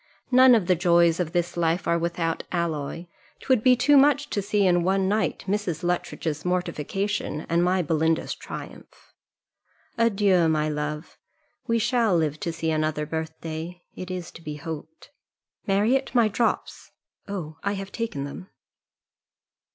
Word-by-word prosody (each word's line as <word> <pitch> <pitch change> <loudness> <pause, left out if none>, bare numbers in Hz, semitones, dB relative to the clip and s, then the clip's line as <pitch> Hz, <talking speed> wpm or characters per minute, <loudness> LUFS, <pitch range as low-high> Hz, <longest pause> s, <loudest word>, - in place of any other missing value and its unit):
None 255 0 +7
of 215 -6 +1
the 185 - +4
joys 170 0 +3
of 170 -3 -1
this 175 0 -1
life 170 0 0
are 170 0 +2
without 165 -1 -2
alloy! 165 -1 -2 0.3
'Twould 260 -5 +2
be 255 +1 +5
too 290 +4 +4
much 290 +1 +4
to 205 - 0
see 200 0 +1
in 175 -1 +3
one 190 +2 +1
night 210 +2 0
Mrs. 190 -4 -2
Luttridge's 170 -3 -2
mortification, 180 0 -2
and 170 +1 +2
my 180 0 +2
Belinda's 160 +1 0
triumph. - - -10 0.9
Adieu! 200 -7 +3
my 155 -1 +1
love: 150 +1 -4 0.5
we 230 - +2
shall 230 -4 +2
live 155 -2 -1
to 170 - -2
see 160 0 -2
another 155 -1 0
birthday, 160 +2 -6
it 185 - -8
is 180 -2 -5
to - - -13
be 150 -2 -6
hoped. 160 - -8 0.6
Marriott, 225 +8 +1
my 235 -2 +5
drops. 220 +3 -2 0.4
Oh, 170 -6 -6
I 200 - -1
have 195 0 -6
taken 225 -12 -3
them." 145 +7 -8
175 Hz, 150 wpm, -25 LUFS, 160-205 Hz, 0.9 s, None